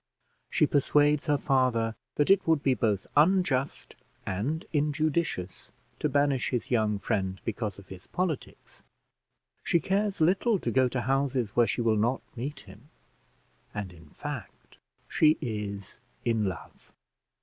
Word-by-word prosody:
She - - +3
persuades 145 +1 +2
her 145 -1 +3
father 125 -5 +1 0.2
that 145 +5 +3
it 195 -2 +4
would 160 -3 +3
be 135 - +3
both 105 -4 0
unjust 150 -4 +2 0.3
and 120 - -2
injudicious 150 - -1 0.3
to 150 - 0
banish 140 -2 +2
his 125 -1 -3
young 110 -3 +2
friend 95 -2 -2
because 110 -3 -3
of 100 -1 -14
his 95 -1 -11
politics; 175 -6 -4 0.8
she 170 - +2
cares 195 +4 0
little 195 +7 +3
to - - -2
go 130 -1 +4
to 125 0 -2
houses 135 -2 0
where 120 +3 +3
she 115 +3 -1
will 110 -2 +2
not 120 +5 +1
meet 135 +4 -5
him, 105 +9 -16 0.9
and, 100 -3 -4
in 80 -3 -16
fact, - - -8 0.3
she 155 0 +4
is 105 -4 -5 0.3
in 115 -3 +1
love. 95 -2 -7
130 Hz, 140 wpm, -28 LUFS, 105-150 Hz, 0.9 s, it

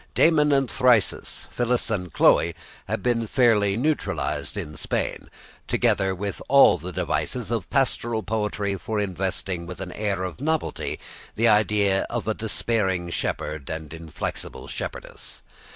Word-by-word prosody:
Damon 150 -3 +4
and 135 -2 +3
Thyrsis, 125 -4 +2
Phyllis 120 -1 0
and 90 -5 -2
Chloe 85 +2 +4 0.3
had - - -2
been 115 -2 +1
fairly 105 -5 +3
naturalised 150 +5 -1
in 75 - -5
Spain, - - -3 0.4
together 95 0 +2
with 100 +1 -4
all 140 -9 +7
the 90 +4 -6
devices 115 +5 -2
of 115 -6 -2
pastoral 120 -4 0
poetry 105 -2 -1
for 110 -1 -2
investing 95 -2 -2
with 90 - -7
an 95 -2 -5
air 100 -2 -2
of 90 +6 -5
novelty 160 +1 -1 0.4
the 115 +3 +3
idea 105 -2 +3
of 120 -2 -3
a 110 - +2
dispairing 100 -5 -1
shepherd 75 -3 -3
and 80 -1 -5
inflexible 80 -2 -6
shepherdess. - - -7
105 Hz, 135 wpm, -25 LUFS, 90-120 Hz, 0.4 s, all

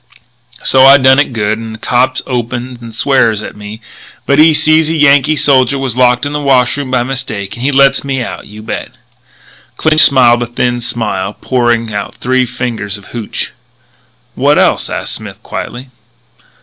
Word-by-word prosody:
"So 130 - +3
I 135 +1 +8
done 130 0 +4
it 145 - 0
good; 110 -2 -1
and 110 -1 -7
a - - -10
cop 125 +3 0
opens 120 0 -4
and 115 -1 -9
swears 115 -3 +1
at - - -8
me, 105 +2 -10 0.4
but 140 +1 +2
when 155 - +7
he - - +4
sees 155 +1 +3
a 165 - -1
Yankee 145 0 +3
soldier 135 -2 +2
was 135 -4 -2
locked 125 +1 +2
in 145 - -4
the 150 - -2
wash 130 -4 +2
room 145 -2 -5
by 125 -2 +1
mistake, 125 -7 -5
he 130 +4 -2
lets 140 0 +3
me 135 -1 -2
out, 125 - -6
you 105 +1 -12
bet." - - -6 0.8
Clinch 155 0 +3
smiled 125 -5 +4
a 120 - -2
thin 120 0 -2
smile, 105 -4 -3
poured 120 -3 0
out 105 +2 -5
three 130 0 0
fingers 110 -5 -4
of 100 - -16
hooch. 115 -3 -5 0.8
"What - - +2
else?" - - +1
asked - - -4
Smith - - -7
quietly. 125 +2 -7
125 Hz, 180 wpm, -12 LUFS, 115-135 Hz, 0.8 s, I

